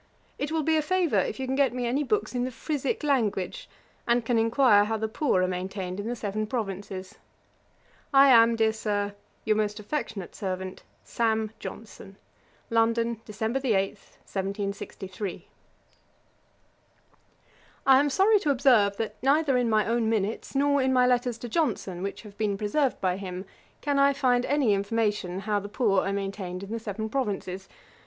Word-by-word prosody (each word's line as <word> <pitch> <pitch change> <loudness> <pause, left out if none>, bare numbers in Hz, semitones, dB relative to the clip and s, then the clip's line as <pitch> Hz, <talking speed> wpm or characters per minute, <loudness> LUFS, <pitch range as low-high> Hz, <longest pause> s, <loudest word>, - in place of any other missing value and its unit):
It 290 +2 -2
will 320 -1 0
be 320 +1 +2
a - - +3
favour 330 - +1
if 205 - -2
you 265 - -2
can 260 +1 -1
get 270 -3 +2
me 250 -1 -2
any 255 +5 0
books 415 +4 -1
in 245 -1 0
the 255 - -1
Frisick 280 +2 -3
language, 225 -10 -1 0.4
and 235 -1 +2
can 235 -1 +2
enquire 225 -2 +4
how 220 +1 -1
the 220 0 -2
poor 220 -5 +1
are - - +2
maintained 185 +1 -4
in 205 - -4
the 240 - -2
Seven 215 -1 -3
Provinces. 195 -5 -5 0.9
I 275 -1 +7
am, 230 -2 +6
dear 220 -1 +2
Sir, 205 -2 -2 0.3
'Your 215 -1 +3
most 210 -1 -1
affectionate 210 -4 -4
servant, 185 -1 -5 0.2
'SAM. 220 -2 0
JOHNSON.' 205 -3 -9 0.6
'London, 230 0 +1
Dec. 215 0 -7 0.2
8, 195 -6 +2 0.4
1763.' 195 0 -5 2.4
I 265 -1 +7
am 290 +1 +2
sorry 400 +8 +4
to 305 - -1
observe, 245 -7 +4
that 225 - -3
neither 280 +1 +3
in 245 -2 +2
my 215 -1 +3
own 230 -1 +1
minutes, 220 +3 -2
nor 285 0 +3
in 260 0 +2
my 250 -1 +4
letters 245 -1 +1
to 240 - -7
Johnson, 220 - -1
which 200 +3 -5
have 205 -2 -12
been 205 -2 0
preserved 250 +7 0
by 185 -1 +1
him, 185 -1 -6 0.4
can 285 -1 +1
I 280 0 +5
find 250 -3 +2
any 275 -7 +3
information 200 -2 -1
how 210 0 0
the 205 0 -8
poor 205 -4 +2
are - - 0
maintained 195 -2 -4
in 200 - -8
the 230 - -2
Seven 220 0 -4
Provinces. 200 -6 -3
220 Hz, 170 wpm, -27 LUFS, 200-260 Hz, 2.4 s, I